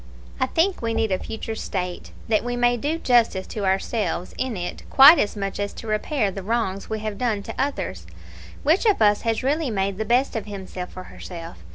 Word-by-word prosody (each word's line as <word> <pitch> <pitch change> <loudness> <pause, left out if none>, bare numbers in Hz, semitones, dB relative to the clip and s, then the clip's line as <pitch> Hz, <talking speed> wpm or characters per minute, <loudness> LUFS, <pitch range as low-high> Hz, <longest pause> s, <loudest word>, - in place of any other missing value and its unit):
"I - - +2
think 360 +4 +1
we 230 -1 -1
need 220 -2 +1
a 185 - +1
future 225 0 -5
state 180 -5 -4 0.2
that 215 -2 +2
we 245 0 -2
may 245 0 +3
do 295 +7 -1
justice 235 - +2
to 205 -2 -2
ourselves 190 -1 -1
in 255 -5 -2
it 175 0 -5
quite 280 +5 +9
as 205 - 0
much 195 -1 -3
as 205 0 -2
to - - -9
repair 215 +1 0
the 195 - -6
wrongs 200 -2 -2
we 220 - -1
may 215 - -8
have 215 -2 -4
done 220 -5 0
to - - -7
others. 95 - -3 0.6
Which 335 +10 +3
of 420 - +3
us 205 -1 +4
has 225 0 -1
really 290 +2 +1
made 195 -2 -1
the - - +1
best 245 +4 +2
of 220 -2 -3
himself 190 -3 -7
or 185 - -5
herself? 165 - -9
220 Hz, 215 wpm, -23 LUFS, 195-245 Hz, 0.6 s, quite